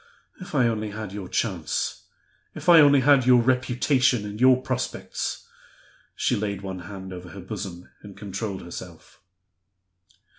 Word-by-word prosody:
If 180 -4 -8
I 130 -4 +4
only 110 -2 -2
had 105 -1 -7
your 100 -3 -6
chance! 90 -9 -2 0.5
If - - -9
I 170 -2 +9
only 145 -2 +6
had 135 -2 +4
your 125 -1 +7
reputation 125 -1 +2
and 105 +2 -7
your 130 0 +6
prospects!" - - -4 0.7
She - - +1
laid 100 -2 -3
one 95 -1 -5
hand 95 +1 -8
over 90 0 -9
her 100 +3 -10
bosom, 95 -2 -7
and 100 -2 -12
controlled 100 0 -5
herself. 90 +1 -11
105 Hz, 145 wpm, -25 LUFS, 95-125 Hz, 0.7 s, I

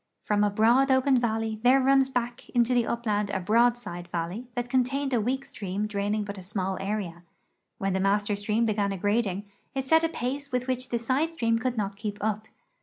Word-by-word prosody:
From 210 -1 +2
a 205 - +3
broad 235 +6 +4
open 260 0 +4
valley 225 -2 -1
there 255 +3 +5
runs 270 0 +4
back 245 -2 -3
into 240 +1 +3
the 240 -2 +2
upland 210 -3 -1
a 200 - -1
broad 235 +6 +3
side 175 -7 -8
valley 175 +8 -4
that 245 0 -2
contained 265 +2 0
a 235 - +3
weak 265 +5 -1
stream 200 +1 -4
draining 205 0 -1
but 200 -1 -6
a - - -8
small 190 0 -3
area. 195 -4 -3 0.6
When 195 -1 -1
the 190 - 0
master 205 +1 +1
stream 210 +3 0
began 205 -2 +1
aggrading, 205 0 0 0.3
it 265 -1 -1
set 320 +3 +5
a 330 - +2
pace 275 +1 -4
with 250 0 -1
which 255 0 -2
the 240 - 0
side 265 +8 0
stream 230 -7 +1
could 250 0 -2
not 200 -1 -2
keep 205 -1 -4
up. 215 +1 -2
225 Hz, 205 wpm, -27 LUFS, 205-250 Hz, 0.6 s, there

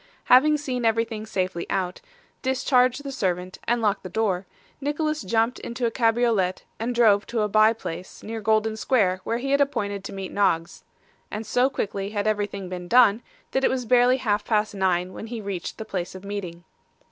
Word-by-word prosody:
Having 300 +4 +5
seen 255 -4 -3
everything 225 -1 0
safely 185 -4 -2
out, 185 -2 -2 0.4
discharged 255 0 +2
the 280 - -5
servant, 185 -6 -2
and 235 0 +1
locked 210 -1 +1
the 185 - -7
door, 190 -2 -1 0.3
Nicholas 305 +1 -1
jumped 225 +5 0
into 240 +1 -4
a 230 - +1
cabriolet 225 -5 +1 0.2
and 240 +2 -2
drove 210 -4 +4
to 230 -2 -1
a 210 - +2
bye 215 +2 +5
place 185 -5 -8
near 225 +1 -5
Golden 220 +1 +2
Square 200 -6 +1
where 230 - 0
he 270 +3 -3
had 280 0 +3
appointed 205 -8 -1
to - - -6
meet 195 -1 -6
Noggs; 170 -4 0 0.5
and 215 +1 -5
so 250 +4 +2
quickly 200 -6 -3
had 205 -1 -2
everything 205 -2 -1
been 180 -1 -6
done, 230 -1 +5 0.3
that 265 - 0
it - - +4
was 255 -2 -2
barely 250 +2 +4
half 210 -5 0
past 215 -1 0
nine 185 -2 0
when 220 - -7
he 235 0 -5
reached 195 -4 -5
the 220 - -6
place 185 -4 -4
of 185 - -9
meeting. 185 -4 -5
215 Hz, 190 wpm, -25 LUFS, 195-245 Hz, 0.5 s, Having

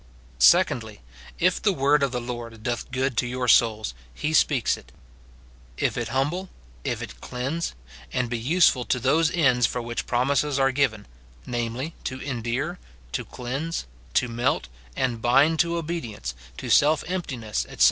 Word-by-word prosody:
Secondly, - - +4 0.4
If 180 +1 +2
the 205 - +3
word 145 0 +3
of 140 -2 +1
the 125 - -1
Lord 120 -2 -7
doth 120 0 -2
good 130 0 -1
to 125 - +2
your 125 0 -2
souls, 110 - +4 0.2
he 150 - -3
speaks 140 -6 +3
it; 60 - -15 0.9
if - - 0
it - - -2
humble, 150 +10 -1 0.3
if - - -2
it - - -9
cleanse, 135 - -3 0.4
and 130 -1 0
be 120 0 -3
useful 140 0 +4
to 120 - +1
those 155 +6 +3
ends 135 -9 +3
for 125 - -3
which 120 0 -4
promises 140 +3 +1
are 135 0 +3
given, 130 -6 0 0.2
— - - -26
namely, 120 +6 -3
to 130 0 -3
endear, 135 +6 -3 0.3
to - - -2
cleanse, 135 +7 -4 0.3
to 125 - +3
melt 120 - 0 0.3
and 120 -3 -1
bind 145 +7 +4
to 170 0 +2
obe 165 0 -3
dience, 100 - -6 0.2
to - - -4
self 150 +1 +5
emptiness, 135 - -3
etc. - - -11
130 Hz, 165 wpm, -25 LUFS, 120-150 Hz, 0.9 s, self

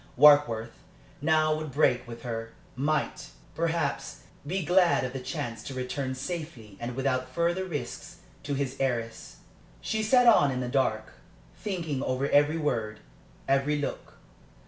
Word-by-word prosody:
Warkworth 125 -6 +5 0.4
now 155 0 +3
would 155 -1 -4
break 130 -3 +2
with 115 0 -9
her 115 -2 -5 0.2
might, 150 +4 -1 0.2
perhaps, 170 +1 -2 0.2
be 185 +1 -1
glad 180 -2 +4
of 125 0 -3
the 135 - -4
chance 125 -3 -4
to 135 - -7
return 130 +1 -3
safely 135 - -6
and 120 +1 -5
without 130 -1 -1
further 170 +6 0
risks 145 -9 -6 0.2
to 140 - -3
his 135 -1 -2
heiress. 115 -4 -2 0.4
She 220 0 -2
sat 245 +3 +4
on 215 -12 +6
in 130 -1 -2
the 125 - -2
dark, 110 -5 0 0.4
thinking 165 -9 -3
over 130 +1 -1
every 145 +3 +4
word, 110 -8 -2 0.5
every 135 +2 +2
look. 145 - -5
135 Hz, 145 wpm, -28 LUFS, 125-155 Hz, 0.5 s, on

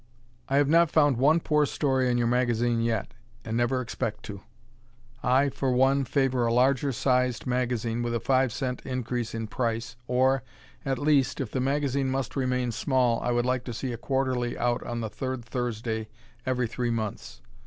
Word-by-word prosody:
I 135 - +2
have 145 -1 +4
not 165 +2 +5
found 145 -5 +3
one 150 +6 +4
poor 150 -2 +2
story 130 -3 +1
in 120 - +1
your 120 - +1
magazine 120 -1 +1
yet, 115 -3 -1 0.3
and 110 - -3
never 120 +2 +1
expect 115 -3 -4
to. 100 -2 -8 0.8
I, 135 +3 +3
for 135 -1 -1
one, 135 +2 +3
favor 130 -2 +1
a - - +1
larger 135 +3 +3
sized 125 -1 +1
magazine 120 -2 -1
with 120 0 -1
a - - 0
five 130 +1 +2
cent 125 0 -3
increase 120 -2 -3
in 115 0 -3
price, 115 0 -2
or, 130 +2 +2 0.4
at 135 -1 0
least, 145 -1 +2
if 130 -6 -3
the 130 - -1
magazine 140 0 0
must 135 -1 -2
remain 125 -2 0
small, 125 0 +1
I - - -1
would 120 0 +1
like 125 -1 0
to 120 - -5
see 125 +1 -3
a - - -5
quarterly 130 -3 -1
out 120 0 0
on 120 0 -4
the 110 - -3
third 130 -2 -4
Thursday 110 -2 -3 0.4
every 125 -1 +1
three 120 +1 -2
months. 110 - -4
125 Hz, 185 wpm, -27 LUFS, 120-135 Hz, 0.8 s, not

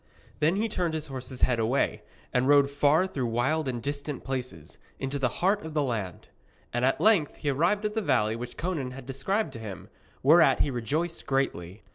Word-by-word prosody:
Then 155 +4 +3
he 215 +3 +1
turned 175 -6 -1
his 155 - -2
horse's 130 -2 -5
head 125 -2 +3
away, 115 +5 +1 0.3
and 125 +1 +2
rode 140 -1 +5
far 145 +5 +3
through 135 -10 -2
wild 135 +7 0
and 120 -3 -3
distant 145 0 -4
places, 125 - -6 0.2
into 135 +1 -3
the 130 -2 +2 0.2
heart 200 +2 +2
of 160 -1 -7
the 150 - +2
land. 105 -9 -4 0.5
And 120 +1 0
at 135 +1 +2
length 200 -9 +3
he 145 - -1
arrived 175 +9 +1
at 210 - -1
the 220 - 0
valley 115 - +1
which 120 +1 -7
Conan 160 -6 -2
had 130 0 -9
described 165 - -1
to 115 - -8
him, 105 -5 -8 0.3
whereat 160 +4 +6
he 145 - +1
rejoiced 150 +8 -2
greatly. 105 -8 -2
140 Hz, 195 wpm, -28 LUFS, 125-160 Hz, 0.5 s, whereat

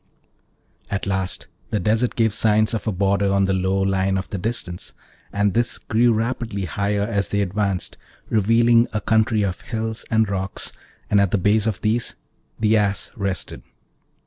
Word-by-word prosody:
At 100 - -2
last 95 -1 -1 0.2
the 105 - 0
desert 110 +3 +1
gave 110 -3 +2
signs 110 0 +3
of 110 - -3
a - - +2
border 100 +1 +1
on 100 0 +3
the 95 - +1
low 95 +1 +1
line 95 0 +1
of 95 - -3
the 100 - -4
distance, 90 -4 -4 0.4
and 100 -1 +1
this 120 +2 +1
grew 120 +2 +2
rapidly 115 -3 -2
higher 100 +4 -1
as 100 -2 -1
they 100 - 0
advanced, 100 -1 -1 0.3
revealing 115 +2 +4
a 105 - 0
country 110 0 +2
of 95 -2 -2
hills 110 -1 -3
and 110 -1 +3
rocks, 95 0 -3 0.4
and 100 -1 +5
at 100 - +2
the 100 - +1
base 105 +3 +2
of 110 - -2
these 115 +2 0 0.4
the 110 0 +3
Ass 100 -1 0
rested. 100 -3 -3
105 Hz, 170 wpm, -22 LUFS, 95-110 Hz, 0.4 s, and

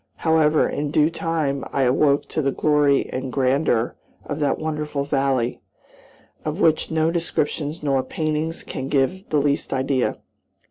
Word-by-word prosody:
However, 160 -1 +3
in 145 0 -2
due 155 +2 +3
time 160 -5 -1
I 135 - +1
awoke 140 +3 +2
to 155 - -1
the 135 -1 +1
glory 145 -2 +2
and 130 0 -4
grandeur 130 -3 +1 0.3
of 145 0 -4
that 145 -2 +1
wonderful 150 -2 -3
valley, 135 -4 0 0.8
of 155 +4 -3
which 160 -5 +3
no 160 0 +1
descriptions 155 -2 -2
nor 135 -2 +2
paintings 155 +4 -2
can 130 - -5
give 145 +8 0
the 150 - +1
least 145 0 0
idea. 130 -1 0
145 Hz, 145 wpm, -22 LUFS, 135-155 Hz, 0.8 s, However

